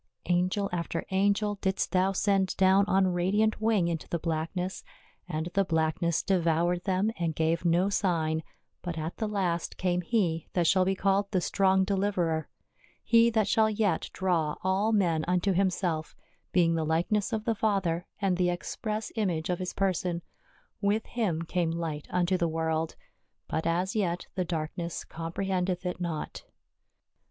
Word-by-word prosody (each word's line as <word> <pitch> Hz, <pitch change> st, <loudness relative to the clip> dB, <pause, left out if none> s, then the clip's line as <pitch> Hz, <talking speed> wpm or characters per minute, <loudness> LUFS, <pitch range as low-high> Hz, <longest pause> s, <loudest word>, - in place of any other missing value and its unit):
Angel 185 Hz, +3 st, +1 dB
after 170 Hz, -1 st, -2 dB
angel 200 Hz, +1 st, +1 dB
didst 190 Hz, 0 st, 0 dB
thou 185 Hz, +1 st, +3 dB
send 195 Hz, -1 st, +1 dB
down 190 Hz, +1 st, +5 dB
on 190 Hz, -1 st, +3 dB
radiant 205 Hz, +5 st, +1 dB
wing 215 Hz, -6 st, +2 dB
into 165 Hz, -2 st, -3 dB
the 170 Hz, -, 0 dB
blackness, 165 Hz, +3 st, -3 dB, 0.5 s
and 160 Hz, 0 st, -2 dB
the 195 Hz, -, +3 dB
blackness 160 Hz, -1 st, 0 dB
devoured 175 Hz, -1 st, +1 dB
them 195 Hz, +2 st, +1 dB
and 165 Hz, -2 st, -1 dB
gave 165 Hz, +2 st, 0 dB
no 175 Hz, +3 st, +3 dB
sign, 165 Hz, -6 st, 0 dB, 0.4 s
but 175 Hz, -2 st, -5 dB
at 160 Hz, +2 st, -4 dB
the 220 Hz, -, -1 dB
last 185 Hz, -5 st, -1 dB
came 180 Hz, -1 st, 0 dB
He 170 Hz, -5 st, 0 dB
that 175 Hz, -2 st, +2 dB
shall 185 Hz, +2 st, +4 dB
be 195 Hz, +1 st, +1 dB
called 200 Hz, +1 st, +1 dB
the 190 Hz, -, +1 dB
Strong 190 Hz, +2 st, +2 dB
Deliverer; 190 Hz, -5 st, 0 dB, 0.5 s
He 230 Hz, 0 st, +5 dB
that 220 Hz, -3 st, +1 dB
shall 220 Hz, +1 st, +3 dB
yet 210 Hz, -5 st, 0 dB
draw 170 Hz, -5 st, 0 dB
all 190 Hz, +4 st, +2 dB
men 175 Hz, -7 st, +2 dB
unto 180 Hz, +2 st, +2 dB
himself, 180 Hz, -4 st, 0 dB, 0.4 s
being 170 Hz, -2 st, +3 dB
the 165 Hz, -1 st, 0 dB
likeness 170 Hz, +7 st, 0 dB
of 220 Hz, -1 st, -2 dB
the 230 Hz, -, +2 dB
Father, 190 Hz, -6 st, 0 dB
and 190 Hz, -3 st, +1 dB
the 180 Hz, -1 st, +2 dB
express 215 Hz, +5 st, -3 dB
image 180 Hz, -6 st, 0 dB
of 175 Hz, -, -1 dB
his 185 Hz, -1 st, -3 dB
person; 180 Hz, -3 st, 0 dB, 0.6 s
with 210 Hz, +2 st, +1 dB
Him 190 Hz, -9 st, -1 dB
came 170 Hz, 0 st, 0 dB
light 165 Hz, -3 st, -3 dB
unto 180 Hz, +1 st, +1 dB
the 170 Hz, -, +2 dB
world, 160 Hz, 0 st, -1 dB, 0.5 s
but 160 Hz, +1 st, -2 dB
as 180 Hz, +4 st, 0 dB
yet 180 Hz, -4 st, 0 dB
the 185 Hz, -2 st, -1 dB
darkness 170 Hz, 0 st, -3 dB
comprehend 180 Hz, +3 st, -2 dB
eth 180 Hz, 0 st, -2 dB
it 180 Hz, 0 st, -3 dB
not. 165 Hz, -3 st, -4 dB
180 Hz, 160 wpm, -29 LUFS, 170-195 Hz, 0.6 s, down